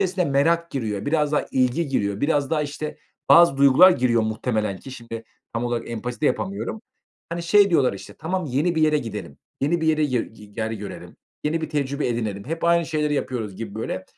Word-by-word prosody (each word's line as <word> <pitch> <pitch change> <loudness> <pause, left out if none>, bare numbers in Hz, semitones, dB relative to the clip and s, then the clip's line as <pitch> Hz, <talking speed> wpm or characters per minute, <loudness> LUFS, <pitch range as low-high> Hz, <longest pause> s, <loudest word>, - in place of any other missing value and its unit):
esne 185 -1 +1
merak 165 +4 +2
giriyor, 110 -4 -3
biraz 150 -1 +1
daha 150 - +1
ilgi 130 +5 +1
giriyor, 100 -6 -1
biraz 145 -1 +1
daha, 155 -2 +1
işte, 150 +1 -5 0.3
bazı 170 -5 +7
duygular 140 +7 +7
giriyor 120 -8 +2
muhtemelen 110 -2 -1
ki 135 - -11
şimdi 115 -2 -8 0.3
tam 115 +1 -1
olarak 120 -1 -3
empati 120 +4 -5
de 150 - +2
yapamıyorum. 200 +3 -2 0.5
Hani, 170 0 -4
şey 200 +3 +5
diyorlar, 135 -9 +3
işte, 100 - -10
"Tamam, 180 +3 -3
yeni 150 +7 0
bir 160 - +1
yere 155 -1 +4
gidelim, 105 - -7 0.2
yeni 160 +5 +1
bir 160 - -1
yere 155 -1 +3
yi 115 -6 -3
ger 110 0 -3
görelim, 105 -2 -8 0.3
yeni 160 +2 0
bir 160 - -3
tecrübe 140 -2 -1
edinelim. 110 -4 -3
Hep 165 +2 -3
aynı 170 -1 +3
şeyleri 150 -2 0
yapıyoruz." 110 -8 -3
gibi, 105 -3 -6
böyle. 95 -4 -4
140 Hz, 195 wpm, -23 LUFS, 115-160 Hz, 0.5 s, bazı